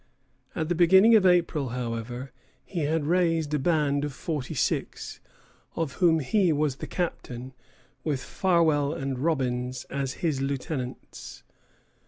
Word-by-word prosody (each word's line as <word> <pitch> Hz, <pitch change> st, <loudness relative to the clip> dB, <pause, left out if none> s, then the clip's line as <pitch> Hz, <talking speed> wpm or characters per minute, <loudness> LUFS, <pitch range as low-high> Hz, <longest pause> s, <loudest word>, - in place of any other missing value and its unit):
At 160 Hz, -2 st, -1 dB
the 175 Hz, -, +1 dB
middle 190 Hz, +6 st, +6 dB
of 195 Hz, -4 st, +5 dB
April, 170 Hz, -6 st, +2 dB
however, 120 Hz, +1 st, -4 dB, 0.3 s
he 180 Hz, -, -4 dB
had 155 Hz, 0 st, 0 dB
raised 165 Hz, -2 st, +1 dB
a 150 Hz, -, +2 dB
band 145 Hz, -2 st, +1 dB
of 145 Hz, -, -2 dB
forty 145 Hz, -2 st, -4 dB
six, -, -, -2 dB, 0.6 s
of 160 Hz, -5 st, -2 dB
whom 165 Hz, -3 st, +4 dB
he 180 Hz, +6 st, +2 dB
was 145 Hz, -3 st, 0 dB
the -, -, -6 dB
captain, 130 Hz, -7 st, -4 dB, 0.5 s
with 145 Hz, -4 st, -1 dB
Farwell 160 Hz, -6 st, +2 dB
and 135 Hz, -4 st, -3 dB
Robbins 130 Hz, -4 st, -1 dB
as 135 Hz, -1 st, -2 dB
his 145 Hz, -5 st, 0 dB
lieutenants. 135 Hz, -1 st, -5 dB
150 Hz, 135 wpm, -27 LUFS, 130-165 Hz, 0.6 s, middle